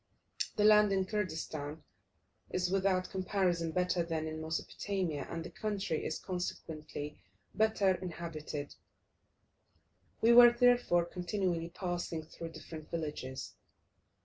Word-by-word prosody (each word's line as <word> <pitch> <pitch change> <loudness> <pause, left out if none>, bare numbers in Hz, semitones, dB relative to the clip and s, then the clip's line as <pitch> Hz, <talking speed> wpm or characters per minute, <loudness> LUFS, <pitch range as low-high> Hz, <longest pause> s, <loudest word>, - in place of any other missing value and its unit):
The 210 - +2
land 210 -1 +7
in 190 -1 +2
Kurdistan 160 -7 -3 0.7
is 180 0 0
without 190 -1 +1
comparison 185 -3 0
better 180 +1 +1
than 165 -2 -2
in 155 0 -5
Mesopotamia, 160 -1 -2
and 165 -1 -4
the - - -7
country 205 -6 -2
is - - -2
consequently 155 -5 -5 0.3
better 215 -3 +3
inhabited; 165 -5 -5 1.5
we 230 +1 +6
were, 240 0 +10
therefore 240 -8 +4
continually 175 -1 -2
passing 175 -2 -3
through 165 +1 -8
different 155 -2 -9
villages. 150 -5 -4
175 Hz, 110 wpm, -33 LUFS, 160-195 Hz, 1.5 s, were